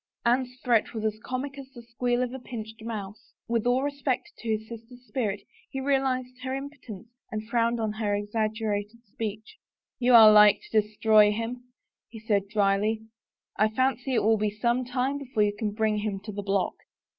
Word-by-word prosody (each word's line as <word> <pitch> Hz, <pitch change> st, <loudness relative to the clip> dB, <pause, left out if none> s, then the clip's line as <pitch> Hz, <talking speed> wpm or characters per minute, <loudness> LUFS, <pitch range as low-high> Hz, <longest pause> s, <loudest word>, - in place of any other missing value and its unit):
Anne's 250 Hz, +1 st, +1 dB
threat 235 Hz, -2 st, +2 dB
was 220 Hz, -1 st, -3 dB
as 215 Hz, 0 st, -1 dB
comic 275 Hz, +2 st, -4 dB
as 270 Hz, -1 st, -10 dB
the 240 Hz, -, -10 dB
squeal 245 Hz, +1 st, -1 dB
of 250 Hz, 0 st, -4 dB
a 265 Hz, -, -5 dB
pinched 225 Hz, -3 st, -8 dB
mouse. 220 Hz, -1 st, -7 dB
With 235 Hz, -1 st, 0 dB
all 250 Hz, +2 st, +2 dB
respect 280 Hz, -2 st, -2 dB
to 230 Hz, -, -6 dB
his 220 Hz, 0 st, -1 dB
sister's 235 Hz, +2 st, -11 dB
spirit, 215 Hz, -7 st, -2 dB, 0.3 s
he 270 Hz, -, -4 dB
realized 260 Hz, -2 st, 0 dB
her 260 Hz, +1 st, -3 dB
impotence 270 Hz, -7 st, -8 dB, 0.2 s
and 215 Hz, 0 st, -4 dB
frowned 235 Hz, 0 st, +1 dB
on 220 Hz, -1 st, -1 dB
her 210 Hz, -2 st, -1 dB
exaggerated 215 Hz, +1 st, -2 dB
speech. 215 Hz, 0 st, -6 dB, 0.2 s
" -, -, -66 dB
You 245 Hz, 0 st, +5 dB
are 220 Hz, -2 st, +10 dB
like 210 Hz, -1 st, +7 dB
to 220 Hz, -, +5 dB
destroy 210 Hz, 0 st, +4 dB
him," 230 Hz, +3 st, -4 dB, 0.4 s
he 225 Hz, -, -10 dB
said 205 Hz, -2 st, 0 dB
dryly. 210 Hz, +1 st, +1 dB, 0.3 s
" -, -, -36 dB
I 215 Hz, -, +5 dB
fancy 255 Hz, +2 st, 0 dB
it -, -, +2 dB
will 220 Hz, +1 st, +4 dB
be 210 Hz, 0 st, 0 dB
some 235 Hz, +4 st, 0 dB
time 255 Hz, +3 st, -1 dB
before 250 Hz, -6 st, 0 dB
you 205 Hz, 0 st, +1 dB
can 215 Hz, 0 st, -2 dB
bring 215 Hz, 0 st, 0 dB
him 205 Hz, -2 st, -3 dB
to 210 Hz, +1 st, -7 dB
the 205 Hz, 0 st, -5 dB
block." 195 Hz, -1 st, 0 dB
225 Hz, 190 wpm, -27 LUFS, 215-250 Hz, 0.4 s, are